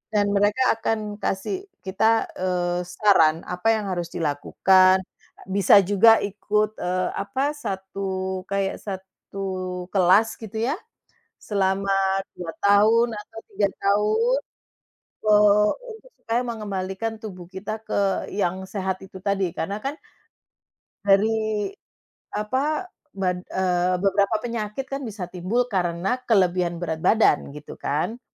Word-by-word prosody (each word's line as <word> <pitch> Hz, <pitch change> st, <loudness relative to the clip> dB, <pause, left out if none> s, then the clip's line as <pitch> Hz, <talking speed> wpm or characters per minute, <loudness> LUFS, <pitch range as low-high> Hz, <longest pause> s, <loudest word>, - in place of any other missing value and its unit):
dan 205 Hz, -1 st, +2 dB
mereka 205 Hz, +5 st, +2 dB, 0.2 s
akan 215 Hz, -2 st, -2 dB
kasih 375 Hz, -, -3 dB, 0.2 s
kita, 220 Hz, +4 st, +2 dB, 0.2 s
eee, 180 Hz, -1 st, 0 dB
saran 175 Hz, -4 st, +3 dB
apa 180 Hz, +4 st, -4 dB
yang 205 Hz, -3 st, -3 dB
harus 175 Hz, -2 st, -2 dB
dilakukan, 185 Hz, +4 st, +3 dB, 0.4 s
bisa 195 Hz, +1 st, +5 dB
juga 205 Hz, +4 st, +5 dB
ikut, 210 Hz, +1 st, 0 dB
eee, 185 Hz, +1 st, -1 dB
apa, 265 Hz, +8 st, -1 dB
1 190 Hz, -6 st, -4 dB
kayak 195 Hz, -1 st, -1 dB
1 190 Hz, 0 st, -8 dB, 0.5 s
kelas 195 Hz, +4 st, +3 dB
gitu 220 Hz, -2 st, -9 dB
ya, 250 Hz, -, -1 dB, 0.6 s
selama 195 Hz, -1 st, 0 dB, 0.5 s
2 170 Hz, -2 st, -5 dB
tahun 215 Hz, +4 st, +5 dB
atau 225 Hz, +2 st, -9 dB
3 200 Hz, +1 st, +1 dB
tahun, 215 Hz, +6 st, +2 dB, 0.8 s
eee, 210 Hz, -1 st, +5 dB, 0.2 s
untuk -, -, -16 dB
supaya 230 Hz, +2 st, -1 dB
mengembalikan 205 Hz, 0 st, -3 dB
tubuh 185 Hz, -5 st, -8 dB
kita 195 Hz, +4 st, -6 dB
ke 200 Hz, -2 st, 0 dB
yang 190 Hz, -1 st, -1 dB
sehat 190 Hz, -1 st, -3 dB
itu 190 Hz, -1 st, -12 dB
tadi. 195 Hz, -3 st, 0 dB
Karena 195 Hz, +4 st, -3 dB
kan 285 Hz, +3 st, -3 dB, 1.1 s
dari, 215 Hz, -, +2 dB, 0.6 s
apa, 265 Hz, -, -1 dB, 0.3 s
ban 180 Hz, -2 st, -1 dB
eee, 180 Hz, -1 st, +1 dB
beberapa 200 Hz, +2 st, +2 dB
penyakit 230 Hz, +1 st, -3 dB
kan 275 Hz, -, -2 dB
bisa 205 Hz, -3 st, -6 dB
timbul 185 Hz, +8 st, 0 dB
karena 180 Hz, +5 st, 0 dB
kelebihan 180 Hz, -5 st, +2 dB
berat 165 Hz, -2 st, -3 dB
badan, 210 Hz, -6 st, +3 dB
gitu 150 Hz, 0 st, -10 dB
kan. 160 Hz, +11 st, -2 dB
200 Hz, 120 wpm, -24 LUFS, 185-220 Hz, 1.1 s, bisa